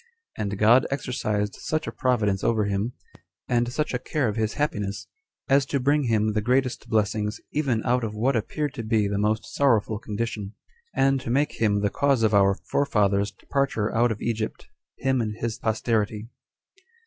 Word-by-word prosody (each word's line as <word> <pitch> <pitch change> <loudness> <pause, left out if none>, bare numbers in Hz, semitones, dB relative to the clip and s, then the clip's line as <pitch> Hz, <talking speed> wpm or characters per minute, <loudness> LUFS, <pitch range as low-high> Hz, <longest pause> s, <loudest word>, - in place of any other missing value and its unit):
And 100 -1 -3
God 115 +5 +5
exercised 105 -7 -2
such 155 0 -2
a - - -4
providence 105 -7 0
over 110 -3 +2
him, 100 +4 -1 0.5
and 120 0 +1
such 150 +2 -2
a 125 - 0
care 140 +1 -1
of 105 - -2
his 110 -1 -1
happiness, 105 -9 -2 0.4
as 140 0 +4
to 140 - 0
bring 140 +2 +2
him 110 -2 +1
the 105 - 0
greatest 125 +3 0
blessings, 105 0 0
even 130 -7 0
out 125 0 +2
of 105 -1 -3
what 125 +5 +1
appeared 145 +6 -2
to 120 -5 -5
be 110 -2 +1
the 100 0 -1
most 110 +2 +1
sorrowful 110 -6 +2
condition; 105 -2 -4 0.4
and 135 -1 +3
to - - -6
make 140 +3 0
him 105 -2 +2
the 100 -1 +1
cause 140 -4 +2
of 110 -1 +3
our 100 -1 +5
forefathers' 100 -6 +1
departure 135 -6 -1
out 120 +1 +3
of 105 - -4
Egypt, 115 -2 -3 0.3
him 130 -2 +1
and 105 -2 -3
his 115 +2 -4
posterity. 110 -1 -1
115 Hz, 175 wpm, -25 LUFS, 105-130 Hz, 0.5 s, God